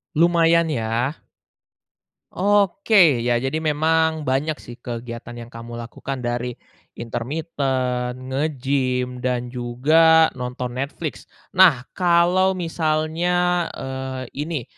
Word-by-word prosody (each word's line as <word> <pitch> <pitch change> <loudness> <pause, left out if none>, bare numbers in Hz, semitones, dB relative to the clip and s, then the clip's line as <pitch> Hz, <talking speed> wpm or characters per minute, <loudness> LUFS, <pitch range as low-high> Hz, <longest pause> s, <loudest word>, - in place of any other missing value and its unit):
Lumayan 170 0 +4
ya? 120 +1 -1 1.2
Oke, 200 - +3
ya 120 0 +1
jadi 145 +4 -1
memang 160 0 +1
banyak 140 +4 0
sih 120 -4 -12
kegiatan 120 0 -7
yang 120 0 -10
kamu 115 0 -9
lakukan 125 +2 -6
dari 120 0 -2 0.4
intermiten, 130 0 -3
nge-gym, 130 -3 -1
dan 125 -1 -2
juga 155 +7 +4
nonton 125 0 -5
Netflix. 140 +5 -5 0.2
Nah, 180 -10 +5
kalau 180 +1 +3
misalnya, 170 +1 0
eee, 130 0 -5 0.2
ini, 155 -8 -3
135 Hz, 95 wpm, -22 LUFS, 125-165 Hz, 1.2 s, Nah